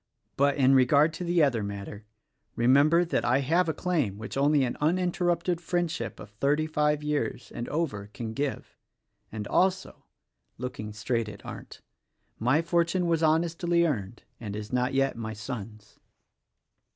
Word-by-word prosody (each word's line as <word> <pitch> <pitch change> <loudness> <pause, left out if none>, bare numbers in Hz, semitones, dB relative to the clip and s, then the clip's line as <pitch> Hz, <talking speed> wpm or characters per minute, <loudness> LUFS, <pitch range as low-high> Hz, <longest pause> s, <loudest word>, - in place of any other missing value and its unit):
But, 140 0 +3
in 135 -1 +5
regard 140 +4 +4
to 165 - -5
the 175 -2 +3
other 125 -6 +2
matter; 100 +1 -7 0.5
remember 145 +8 +4
that 170 - -1
I 125 +3 +2
have 165 +5 +2
a - - 0
claim 155 - -1
which 110 +2 -7
only 140 +1 +3
an 120 - -1
uninterrupted 175 +1 +1
friendship 175 -1 -2
of 105 - -11
thirty 140 +8 +1
five 150 -1 0
years 125 -6 -2
and 120 - -5
over 135 -11 -2
can 110 0 -6
give, 140 +2 -4 0.3
— - - -48
and 105 -2 -5
also," 190 +1 0 0.3
— - - -56 0.2
looking 110 -4 -5
straight 110 +2 -2
at 100 -2 -12
Arndt - - -9 0.3
— - - -44
"my 155 +6 +4
fortune 170 +1 +1
was 165 -1 +1
honestly 170 +2 +2
earned, 110 - -3 0.2
and 105 -3 -6
is 105 +2 -7
not 125 +1 0
yet 135 0 +2
my 110 -1 -5
son's." 110 -1 -8
140 Hz, 165 wpm, -27 LUFS, 110-165 Hz, 0.5 s, in